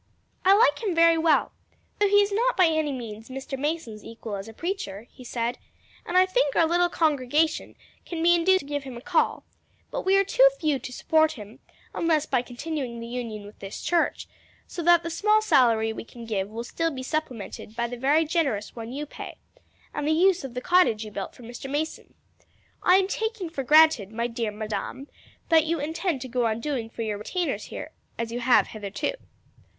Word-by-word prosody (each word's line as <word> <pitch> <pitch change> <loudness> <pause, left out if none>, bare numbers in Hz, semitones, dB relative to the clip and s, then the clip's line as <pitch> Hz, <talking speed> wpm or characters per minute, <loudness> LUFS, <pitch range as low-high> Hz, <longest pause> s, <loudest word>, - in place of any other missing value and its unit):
"I 385 +2 +6
like 470 +1 +4
him 395 -6 -1
very 330 0 +5
well, 320 -1 +3 0.5
though 410 - +4
he 410 +1 +5
is 405 - -3
not 480 +5 +1
by 370 - +6
any 315 -2 +1
means 225 -3 -7
Mr. 270 +1 -5
Mason's 270 -7 -3
equal 225 -2 -7
as 195 +1 -6
a - - -8
preacher," 230 - -5
he 255 - -14
said, 235 0 -3 0.5
"and 355 - +1
I 370 - +7
think 370 - +1
our 330 - +5
little 350 +2 +2
congregation 305 0 +1 0.3
can 330 -2 -4
be 345 +1 +6
induced 375 +2 +4
to - - -13
give 290 0 -3
him 260 -3 -8
a - - -9
call; 345 +3 +1 0.5
but - - -2
we 385 +1 +3
are 395 - +5
too - - +5
few 300 -4 +1
to 255 - -8
support 315 +4 +2
him 210 -2 -11 0.3
unless 320 -3 +1
by 255 -5 +1
continuing 250 -1 -5
the 230 - -6
union 230 -3 -5
with 205 - -14
this 195 0 -7
church, 345 -1 0 0.4
so 345 - -6
that 345 0 +5
the 335 - -4
small 425 +5 +3
salary 240 - +3
we - - -7
can 235 0 -11
give 200 -3 -2
will 225 +2 -5
still 330 +7 -1
be 260 -4 -6
supplemented 255 -7 -4
by 235 - 0
the 245 - -6
very 285 +6 +2
generous 280 - -1
one 230 0 -7
you 290 +3 -4
pay, - - -9 0.6
and 295 0 -2
the 310 - +3
use 365 +1 +3
of 255 -2 -7
the 250 - -3
cottage 255 -11 +3
you 215 - -9
built 200 -2 -6
for 245 - -14
Mr. 240 +3 -8
Mason. 300 +3 -4 0.7
I 365 - +5
am 380 0 +3
taking 440 -4 -3
for 330 - -3
granted, 300 -7 +5
my 230 +1 -2
dear 230 -2 -2
Madame, 215 +6 -5 0.4
that 320 -1 +5
you 335 0 0
intend 320 0 -2
to 260 - -5
go 245 -1 0
on 220 0 -1
doing 250 -4 -3
for 230 - -5
your 210 -2 -3
retainers 350 - -2
here - - -8 0.3
as 230 0 -3
you 240 - -3
have 250 0 +4
hitherto." 205 - -3
285 Hz, 210 wpm, -26 LUFS, 230-335 Hz, 0.7 s, I